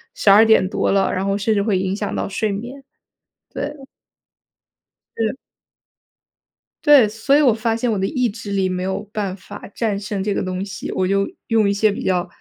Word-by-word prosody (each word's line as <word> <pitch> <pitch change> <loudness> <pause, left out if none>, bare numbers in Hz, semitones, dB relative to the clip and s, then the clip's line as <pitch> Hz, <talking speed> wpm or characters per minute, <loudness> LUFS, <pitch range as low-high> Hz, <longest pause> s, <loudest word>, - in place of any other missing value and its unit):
12:00 215 -1 +5
多 - - 0
了， 195 0 +2
然 185 - -1
后 200 0 0
甚 215 +2 0
至 200 - +1
会 205 -3 +1
影 190 +1 -1
响 205 0 -4
到 - - -2
睡 210 +2 -1
眠， 240 +7 -7 0.7
对。 295 +1 -4 1.4
是。 225 +2 -1 1.5
对， 285 -6 +7
所 220 +6 +1
以 295 - +5
我 260 -6 +5
发 225 +1 -1
现 230 +1 -1
我 210 - 0
的 190 - 0
意 250 -2 0
志 205 -1 -8
力 195 -1 +1
没 180 0 -3
有 190 +1 -2
办 200 -4 -3
法 200 +2 -11
战 210 -4 -1
胜 205 -1 -4
这 205 0 -1
个 - - -1
东 185 0 -3
西， 200 +1 -6
我 185 - 0
就 195 +1 +1 0.2
用 220 -3 +3
一 - - +1
些 210 +1 +2
比 - - -5
较 180 -2 0
205 Hz, 205 characters per minute, -20 LUFS, 195-225 Hz, 1.5 s, 对